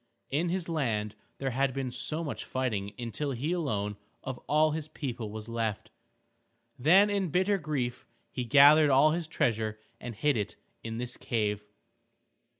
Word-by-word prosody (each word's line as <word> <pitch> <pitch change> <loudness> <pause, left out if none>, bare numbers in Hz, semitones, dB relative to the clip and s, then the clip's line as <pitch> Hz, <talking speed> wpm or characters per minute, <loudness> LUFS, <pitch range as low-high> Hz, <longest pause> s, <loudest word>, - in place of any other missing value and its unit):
In 160 +5 +1
his 180 -1 -2
land 115 -10 -1 0.2
there 135 -1 -2
had 135 +1 0
been 135 -2 -2 0.3
much 145 - -4
fighting 105 -6 -2
until 125 +4 -3
he 135 +7 -2
alone 105 - -1 0.3
of 130 -2 -5
all 155 +1 +4
his 155 0 -3
people 125 -7 -5
was 110 +1 -7
left. 115 -2 -3 0.9
Then 190 +10 +6
in 195 -3 0
bitter 190 +5 +2
grief 135 -6 -3 0.2
he 125 - -3
gathered 145 +4 +7
all 140 +3 +5
his 165 0 -2
treasure 110 -8 0 0.2
and 120 -2 -7
hid 145 +4 +1
it 105 - -3 0.3
in 115 0 -5
this 125 +1 -4
cave. 105 -3 -1
130 Hz, 150 wpm, -29 LUFS, 115-155 Hz, 0.9 s, gathered